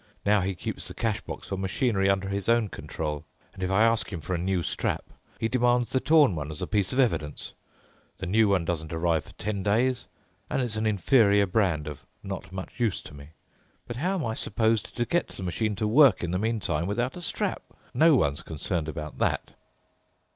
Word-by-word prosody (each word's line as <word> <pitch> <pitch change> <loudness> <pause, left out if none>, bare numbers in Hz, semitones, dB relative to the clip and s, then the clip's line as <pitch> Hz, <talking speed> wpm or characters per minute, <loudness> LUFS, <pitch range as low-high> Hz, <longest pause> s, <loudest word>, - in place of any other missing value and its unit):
Now 105 0 +4
he 95 +1 -1
keeps - - -5
the - - -9
cash 110 -3 -1
box - - -8
for 95 - -2
machinery 95 +1 +1
under 95 0 +1
his 100 +2 -2
own 115 -3 +3
control, 75 -4 -4 0.3
and - - -11
if 95 - 0
I 95 +3 +4
ask 115 -1 +2
him 85 - -4
for 85 +4 -4
a - - +1
new 90 0 0
strap, - - -1 0.4
he 115 - +1
demands 120 -1 +2
the 130 - +2
torn 150 - +5
one 75 -1 -4
as 75 - -6
a - - -2
piece 100 -3 0
of 130 - -1
evidence, 75 - 0 0.6
the 95 - -5
new 110 +4 +3
one 95 -4 +2
doesn't 80 -2 -3
arrive 80 -1 0
for - - -15
ten 105 -1 -3
days, 120 +6 +1 0.4
and - - 0
it's 120 -4 -1
an 110 0 0
inferior 100 0 +4
brand, 90 -6 +1
of 75 -3 -7 0.2
not 95 -1 -6
much 95 +6 -7
use 115 -6 +1
to - - -11
me. 70 +2 -12 0.5
But 120 - -6
how 180 +3 -1
I - - -1
am 110 - -2
supposed 110 -1 0
to 120 - +1
get 175 +9 +1
the 95 - -9
machine 105 +4 -1
to 105 +2 -1
work 135 +1 +6
in 85 - -1
the 90 - 0
meantime 100 -7 -1
without 120 +6 -1
a 180 - -7
strap—no 165 -2 0
one's 75 - +1
concerned 80 +1 -3
about 75 -1 -6
that." - - 0
100 Hz, 210 wpm, -27 LUFS, 90-115 Hz, 0.6 s, work